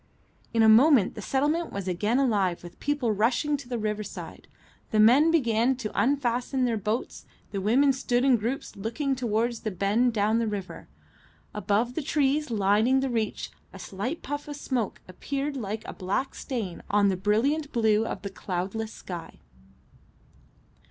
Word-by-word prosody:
In 225 -1 +3
a - - +6
moment 230 0 +6
the 215 - -7
settlement 295 +8 0
was 195 -1 -5
again 205 +7 0
alive 205 -11 +1
with 175 0 -12
people 285 -6 0
rushing 235 +8 +1
to 265 -3 -12
the 245 - -2
riverside. 215 -1 -5 0.4
The 215 - +1
men 255 +9 +6
began 245 -5 +2
to 240 -4 -5
unfasten 255 -1 +1
their 235 -2 +1
boats, 215 +4 -3 0.2
the 195 - -3
women 265 +8 +4
stood 250 -1 0
in 265 -2 +5
groups 235 +5 -4
looking 235 +7 -2
towards 235 -1 -1
the 215 - -3
bend 205 +6 +1
down 215 +1 +2
the 230 - 0
river. 200 -3 -5 0.7
Above 210 +4 0
the 320 - -2
trees 290 +1 +1
lining 220 +5 +3
the 270 -1 -1
reach 220 -3 -2 0.2
a - - -9
slight 200 - -5
puff 290 +1 -5
of 295 - -5
smoke 255 -6 -3
appeared 275 +10 -4
like 220 -3 -4
a - - -6
black 200 +8 -2
stain 220 - -5
on 205 -1 +3
the 190 - +1
brilliant 240 - +1
blue 220 -3 +2
of - - -5
the 200 - -5
cloudless 195 +4 -4
sky. 175 -6 -8
230 Hz, 165 wpm, -27 LUFS, 205-265 Hz, 0.7 s, a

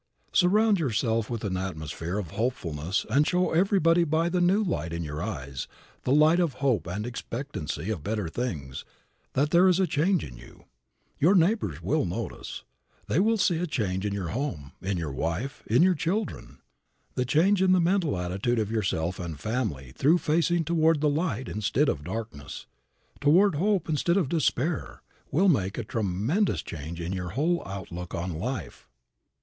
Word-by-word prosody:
Surround 205 +3 +4
yourself 115 -5 0
with 115 -2 -4
an 95 -3 -1
atmosphere 85 -1 -4
of 90 -7 -4
hopefulness 90 - -2
and 145 +5 +4
show 180 0 +1
everybody 170 -1 +4
by 165 +1 +1
the 180 0 0
new 190 +5 +3
light 85 - -2
in 85 0 -3
your 75 0 -5
eyes, 70 -10 -5 0.4
the 125 - +1
light 155 +4 +5
of 170 -6 +1
hope 125 - 0
and 100 +5 -3
expectancy 115 - -4
of 95 -8 -3
better 105 -2 -2
things, 80 - -4 0.5
that 145 +3 +1
there 175 +2 +6
is 185 0 +4
a 190 - +4
change 175 +3 +1
in 60 - -8
you. - - -15 0.5
Your 175 +7 +5
neighbors 195 +6 +1
will - - +1
notice - - -5 0.4
it. - - -30
They - - +4
will 220 +3 +3
see 180 -4 +2
a 180 - -1
change 100 - -1
in 105 - -1
your 100 -4 -3
home, 90 - -4
in 95 0 -1
your 80 -4 -3
wife, 85 - -3
in 120 +9 +4
your 185 0 +5
children. 180 +6 -3 0.5
The 125 - 0
change 180 +10 +3
in 190 -1 +4
the 185 - +5
mental 175 - +1
attitude 95 +7 -1
of 110 -1 -1
yourself 95 -5 -1
and 85 -4 -5
family, 105 - -3
through 150 - +3
facing 170 +1 +1
toward 160 -1 +3
the 150 - +3
light 145 - -1
instead 105 -2 +1
of 70 - -2
darkness, 90 -7 -6 0.5
toward 175 +8 +5
hope 190 +3 +1
instead 170 +3 +1
of 170 -9 +1
despair, 155 -1 -1 0.3
will 185 +8 +3
make 100 - +2
a 120 - -2
tremendous 110 - 0
change 80 +2 -7
in 85 +2 -3
your 90 -2 -3
whole 155 - 0
outlook 90 -2 -6
on 85 +1 -3
life. 125 +12 -5
125 Hz, 175 wpm, -27 LUFS, -, 0.5 s, there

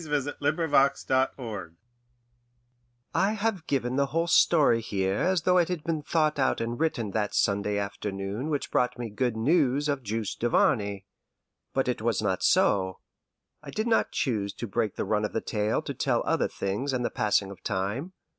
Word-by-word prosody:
VII. 145 -2 -1
"QUOTH - - -31
LITTLE 145 -2 +3 0.5
GARAINE" 105 -10 -7 1.4
I 195 +3 +2
have 215 -5 -2
given 130 -2 0
the 140 0 +2
whole 165 +4 0
story 150 -8 +4
here 95 -2 -1
as 185 -3 +1
though 180 0 +4
it 170 - +3
had 180 -4 -3
been 160 -1 -1
thought 155 -1 +1
out 130 - +2
and 115 +2 -3
written 125 -10 -1
that 105 0 -1
Sunday 100 0 +1
afternoon 100 +5 -4
which 145 -2 -2
brought 125 0 +1
me 120 -3 -5
good 120 +1 -1
news 145 +2 +2
of 140 -2 -1
Juste 110 -2 -3
Duvarney. 100 -4 +1 0.7
But 135 -1 +1
it 125 -3 -1
was 115 -2 +1
not 95 -4 0
so. 95 -2 +3 0.6
I - - -10
did 215 - -2
not 230 -1 +2
choose 105 -6 -1
to - - -5
break 110 -1 -1
the - - -2
run 105 -1 0
of 105 - -2
the - - +1
tale 105 0 -1
to - - -4
tell - - 0
of - - -6
other - - +1
things 105 +9 -3
and 125 -1 -1
of - - -1
the - - -33
passing 105 -2 +1
of 100 - -12
time. 105 - -3
120 Hz, 190 wpm, -27 LUFS, 105-150 Hz, 1.4 s, story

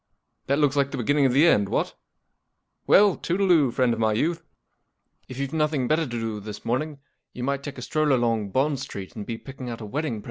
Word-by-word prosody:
That 140 - +2
looks 145 -2 +2
like 140 -1 +2
the - - -5
beginning 140 +3 +2
of - - 0
the 140 +6 +5
end, 105 -12 +4
what? - - -1 0.9
Well, 200 -2 +6
toodle 190 +2 0
oo, 150 -6 +5
friend 120 0 +1
of 115 - -4
my 110 -1 +2
youth. 165 +9 -1 0.9
H 130 - -8
you've 140 +1 -3
nothing 150 -5 0
better 160 +3 +2
to 120 -1 -4
do 110 -2 -3
this 105 0 -9
morning, 145 +5 -1 0.4
you 125 - -6
might 140 +1 -1
take 140 -1 -7
a 125 - -6
stroll 155 +1 +1
along 115 -5 +1
Bond 135 +5 +1
Street 100 -8 -7
and 105 -2 -7
be 115 - -4
picking 130 0 -8
out 115 - -6
a 110 - -7
wedding 145 +5 -2
present." 110 - -5
135 Hz, 225 wpm, -25 LUFS, 115-150 Hz, 0.9 s, Well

